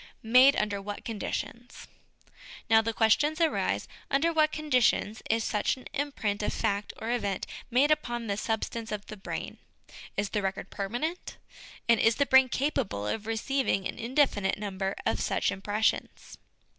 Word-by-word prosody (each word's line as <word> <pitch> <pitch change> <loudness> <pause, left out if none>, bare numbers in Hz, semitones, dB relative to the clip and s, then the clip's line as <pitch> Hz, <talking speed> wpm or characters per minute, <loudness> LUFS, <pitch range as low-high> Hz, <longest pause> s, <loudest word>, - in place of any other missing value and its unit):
Made 255 +5 +6
under 205 -1 -1
what 205 +1 -7
Conditions. 235 +2 -5 0.8
Now, 220 0 +7
the 230 +1 -1
questions 290 +9 +2
arise, 330 -2 +1 0.2
Under 310 +5 +2
what 310 -1 +3
conditions 255 -8 +1
is 225 0 +2
such 210 +4 0
an 255 - -14
imprint 225 -8 -2
of 210 - -1
fact 205 -2 -1
or 225 - -3
event 200 -6 -1 0.2
made 265 +5 +3
upon 240 -6 0
the 200 -2 -1
substance 225 +1 -3
of 210 -1 -4
the 215 - -8
brain? 200 - -6 0.6
Is 200 0 0
the 210 - -1
record 195 0 -3
permanent? 245 - -4 0.5
And 235 -1 +5
is 225 0 +4
the 280 - +2
brain 265 0 +6
capable 255 - -1
of 215 - -3
receiving 225 -3 0
an - - -7
indefinite 235 -5 +1
number 195 -1 -3
of - - +1
such - - +1
impressions? 205 +3 -2
225 Hz, 155 wpm, -29 LUFS, 205-265 Hz, 0.8 s, Now